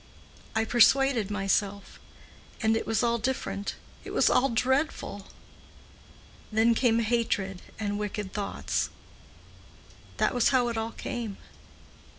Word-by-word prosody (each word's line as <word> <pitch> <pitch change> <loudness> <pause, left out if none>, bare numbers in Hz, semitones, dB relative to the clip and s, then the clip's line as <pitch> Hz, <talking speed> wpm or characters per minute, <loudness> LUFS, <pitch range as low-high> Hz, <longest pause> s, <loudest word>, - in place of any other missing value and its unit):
I 220 0 +2
persuaded 240 -1 +4
myself. 200 0 -1 0.6
And 220 0 +2
it 225 - -2
was 225 +1 +1
all 235 0 +2
different. 220 -4 -2 0.3
It - - -8
was - - +3
all 260 +2 +3
dreadful. 250 -4 -1 1.2
Then 220 +2 +4
came 230 -1 +3
hatred 210 -5 -1 0.2
and 205 -1 -2
wicked 210 -2 -4
thoughts. 205 -1 -2 1.3
That - - +2
was 245 -2 +3
how 250 -3 +3
it 235 - -3
all 225 +1 -3
came. 230 -5 -5
225 Hz, 120 wpm, -28 LUFS, 205-240 Hz, 1.3 s, persuaded